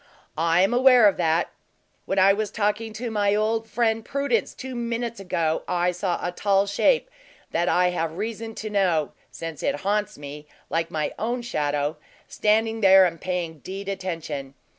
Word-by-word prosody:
"I 165 Hz, +2 st, +3 dB
am 195 Hz, -, +2 dB
aware 250 Hz, -3 st, +6 dB
of 200 Hz, -, +2 dB
that. 165 Hz, -1 st, +1 dB, 0.6 s
When 195 Hz, -, -1 dB
I 195 Hz, +1 st, +6 dB
was 210 Hz, 0 st, -2 dB
talking 210 Hz, +1 st, -1 dB
to 230 Hz, +2 st, -4 dB
my 205 Hz, -1 st, +2 dB
old 220 Hz, +1 st, 0 dB
friend, 225 Hz, -1 st, +1 dB
Prudence, 280 Hz, -, -1 dB
two 260 Hz, -1 st, -7 dB
minutes 235 Hz, -1 st, -3 dB
ago, 165 Hz, -4 st, -1 dB
I 175 Hz, 0 st, +1 dB
saw 180 Hz, 0 st, -2 dB
a 175 Hz, -, -1 dB
tall 195 Hz, +2 st, +2 dB
shape 205 Hz, -, +2 dB, 0.4 s
that 170 Hz, +1 st, +1 dB
I 180 Hz, 0 st, +3 dB
have 165 Hz, -2 st, -3 dB
reason 225 Hz, +1 st, -4 dB
to 215 Hz, -, -5 dB
know, 180 Hz, -7 st, +1 dB, 0.2 s
since 165 Hz, -2 st, -7 dB
it 145 Hz, -, -1 dB
haunts 205 Hz, +1 st, -1 dB
me, 145 Hz, +1 st, -9 dB, 0.2 s
like 165 Hz, 0 st, 0 dB
my 155 Hz, -1 st, -2 dB
own 240 Hz, +2 st, -2 dB
shadow, 150 Hz, -6 st, -1 dB, 0.3 s
standing 220 Hz, +1 st, +1 dB
there 190 Hz, -1 st, +7 dB
and 170 Hz, -3 st, -3 dB
paying 175 Hz, -4 st, -3 dB
deed 195 Hz, +5 st, -7 dB
attention. 165 Hz, -8 st, -5 dB
195 Hz, 170 wpm, -24 LUFS, 165-220 Hz, 0.6 s, there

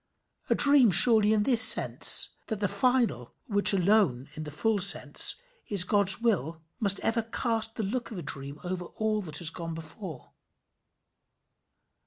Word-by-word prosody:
A -, -, 0 dB
dream 280 Hz, -5 st, +4 dB
surely 215 Hz, +3 st, +5 dB
in 215 Hz, -1 st, -1 dB
this 240 Hz, -1 st, 0 dB
sense, 225 Hz, -, +4 dB, 0.2 s
that 220 Hz, -3 st, -7 dB
the 205 Hz, -, -2 dB
final, 240 Hz, -, -3 dB
which 205 Hz, -2 st, +4 dB
alone, 180 Hz, -, -1 dB
in 155 Hz, 0 st, -10 dB
the -, -, -9 dB
full 210 Hz, +8 st, -3 dB
sense, 195 Hz, +1 st, +2 dB, 0.3 s
is 200 Hz, -4 st, +4 dB
God's 200 Hz, 0 st, +1 dB
will, 170 Hz, -, -4 dB, 0.2 s
must 200 Hz, -3 st, +1 dB
ever 230 Hz, +1 st, -2 dB
cast 225 Hz, 0 st, -5 dB
the 220 Hz, -, -6 dB
look 235 Hz, +5 st, -6 dB
of 220 Hz, -, -11 dB
a 175 Hz, -, -9 dB
dream 140 Hz, +1 st, -7 dB
over 180 Hz, 0 st, -7 dB
all 215 Hz, +3 st, -5 dB
that 155 Hz, -6 st, -8 dB
has 165 Hz, -2 st, +2 dB
gone 165 Hz, -1 st, -9 dB
before. 160 Hz, -, -12 dB
200 Hz, 160 wpm, -25 LUFS, 165-225 Hz, 0.3 s, surely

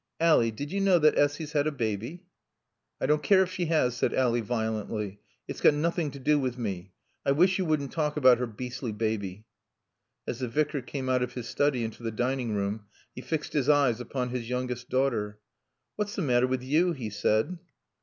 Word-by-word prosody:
Ally 160 Hz, -8 st, +4 dB
did 140 Hz, +7 st, -6 dB
you 200 Hz, +1 st, -1 dB
know 195 Hz, -2 st, +5 dB
that 155 Hz, -2 st, +4 dB
Essy's 145 Hz, +1 st, +1 dB
had 150 Hz, -1 st, +1 dB
a -, -, +1 dB
baby?" 120 Hz, -, -3 dB, 0.8 s
"I -, -, -1 dB
don't 150 Hz, +2 st, +2 dB
care 190 Hz, +4 st, +5 dB
if 185 Hz, -, -5 dB
she 185 Hz, -1 st, -2 dB
has," 150 Hz, -7 st, +2 dB
said -, -, 0 dB
Ally 120 Hz, -2 st, +2 dB
violently. 110 Hz, -3 st, -3 dB, 0.3 s
"It's -, -, -6 dB
got 145 Hz, -, +6 dB
nothing 165 Hz, +1 st, 0 dB
to 140 Hz, -, -9 dB
do 150 Hz, +2 st, +2 dB
with 130 Hz, -2 st, -2 dB
me. 95 Hz, -5 st, -5 dB, 0.3 s
I 140 Hz, -, +3 dB
wish 185 Hz, +6 st, +3 dB
you 185 Hz, -, 0 dB
wouldn't 150 Hz, -4 st, 0 dB
talk 150 Hz, -2 st, -1 dB
about 130 Hz, -4 st, +6 dB
her 125 Hz, -, -1 dB
beastly 125 Hz, +2 st, -5 dB
baby." 105 Hz, -2 st, -3 dB, 0.8 s
As 120 Hz, -, -4 dB
the 125 Hz, -, -2 dB
Vicar 150 Hz, +3 st, 0 dB
came 130 Hz, +2 st, -5 dB
out 130 Hz, -1 st, +2 dB
of 125 Hz, 0 st, -2 dB
his 125 Hz, -2 st, -6 dB
study 140 Hz, -3 st, +1 dB
into 115 Hz, +1 st, -6 dB
the 115 Hz, -, -2 dB
dining 120 Hz, 0 st, -1 dB
room, 100 Hz, +1 st, -3 dB, 0.3 s
he 125 Hz, -, -7 dB
fixed 155 Hz, +2 st, -3 dB
his 145 Hz, -2 st, +1 dB
eyes 140 Hz, -6 st, +4 dB
upon 125 Hz, +1 st, -3 dB
his 120 Hz, -2 st, -4 dB
youngest 125 Hz, -1 st, -3 dB
daughter. 115 Hz, -6 st, 0 dB, 0.6 s
"What's 210 Hz, 0 st, -2 dB
the 190 Hz, -, -1 dB
matter 125 Hz, -3 st, +3 dB
with 130 Hz, 0 st, -2 dB
you?" 160 Hz, +7 st, +2 dB
he 120 Hz, -8 st, -5 dB
said. 110 Hz, -, 0 dB
130 Hz, 205 wpm, -28 LUFS, 115-150 Hz, 0.8 s, got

